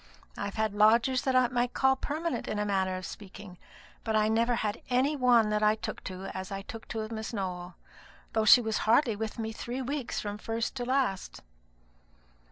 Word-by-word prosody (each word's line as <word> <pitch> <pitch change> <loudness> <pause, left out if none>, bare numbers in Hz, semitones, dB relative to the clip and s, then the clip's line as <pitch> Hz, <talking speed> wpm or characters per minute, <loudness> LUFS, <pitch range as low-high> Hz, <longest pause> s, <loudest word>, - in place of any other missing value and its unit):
I've 200 -1 -4
had 220 -2 0
lodgers 230 +5 +4
that 265 -1 0
I 255 -1 +5
might 245 0 -1
call 265 0 +4
permanent, 315 +5 -3
in 215 - -2
a 210 - 0
manner 190 -2 0
of 185 - -7
speaking; 195 -2 -10 0.4
but 220 -1 -1
I 215 0 +3
never 230 +2 +2
had 215 -2 -2
any 260 +4 +2
one 240 -5 +4
that 210 0 +1
I 215 0 +4
took 220 - -6
to 185 0 -6
as 190 0 -5
I 195 0 -4
took 225 +2 -9
to 220 -1 -4
Miss 220 +1 -5
Nowell, 180 -3 -4 0.6
though 220 -1 +1
she 245 +3 +9
was 220 -2 -1
hardly 235 -1 +4
with 220 +1 -4
me 220 -1 -3
three 245 +3 -5
weeks 275 0 -3
from 205 0 -5
first 225 +1 -2
to 245 - -3
last." 255 -7 -1
220 Hz, 195 wpm, -29 LUFS, 205-245 Hz, 0.6 s, she